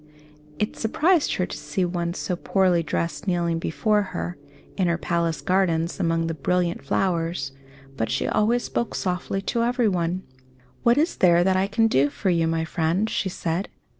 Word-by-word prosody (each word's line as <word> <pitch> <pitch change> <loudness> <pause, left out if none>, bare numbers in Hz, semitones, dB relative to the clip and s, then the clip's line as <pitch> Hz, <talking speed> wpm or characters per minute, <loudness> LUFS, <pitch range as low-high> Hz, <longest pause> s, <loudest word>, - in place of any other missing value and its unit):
It 210 - -2
surprised 310 +9 +2
her 180 - 0
to - - -7
see 150 +5 -2
one 175 -1 -2
so 180 - -2
poorly 180 -1 +2
dressed 165 +2 -3
kneeling 170 -2 +1
before 210 +6 +1
her, 180 -3 -4 0.4
in 185 -3 +1
her 170 0 +1
palace 170 -2 -1
gardens, 175 -2 +1
among 165 -2 +1
the 165 - -2
brilliant 175 +3 0
flowers; 165 -6 -1 0.5
but 115 -1 -1
she - - 0
always 235 +3 +2
spoke 235 - -2
softly 185 +1 -2
to 235 - 0
everyone. 190 -8 0 0.6
"What 240 +1 +4
is 315 +4 +1
there 175 -1 +5
that 190 +1 +2
I 190 +1 +2
can 225 +3 +2
do 140 -8 +3
for 185 +6 -1
you, 165 -1 +2
my 165 0 0
friend?" 170 +6 0
she 190 - -1
said. 175 +1 -2
180 Hz, 170 wpm, -24 LUFS, 165-200 Hz, 0.6 s, there